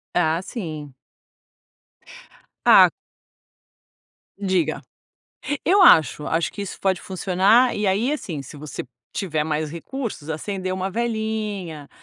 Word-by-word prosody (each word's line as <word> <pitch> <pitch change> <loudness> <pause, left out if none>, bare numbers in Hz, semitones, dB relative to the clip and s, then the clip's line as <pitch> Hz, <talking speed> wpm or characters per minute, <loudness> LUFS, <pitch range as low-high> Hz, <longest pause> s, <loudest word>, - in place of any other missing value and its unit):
Ah 165 -1 +2
sim. 155 - -6 1.7
Ah - - +8 1.5
Diga. 185 -6 0 0.8
Eu 390 +3 +5
acho, 155 - +6
acho 165 +1 0
que 200 - -5
isso 200 - -7
pode 190 -2 +1
funcionar. 195 +6 +3
E 210 - -1
aí, 210 +8 +1
assim, 170 - -4
se 135 - -11
você 150 0 -7 0.3
tiver 155 -6 -1
mais 155 0 -2
recursos, 185 - -6
acender 185 +4 -3
uma 190 +1 -3
velinha, 215 -8 -3
185 Hz, 110 wpm, -23 LUFS, 155-215 Hz, 1.7 s, Ah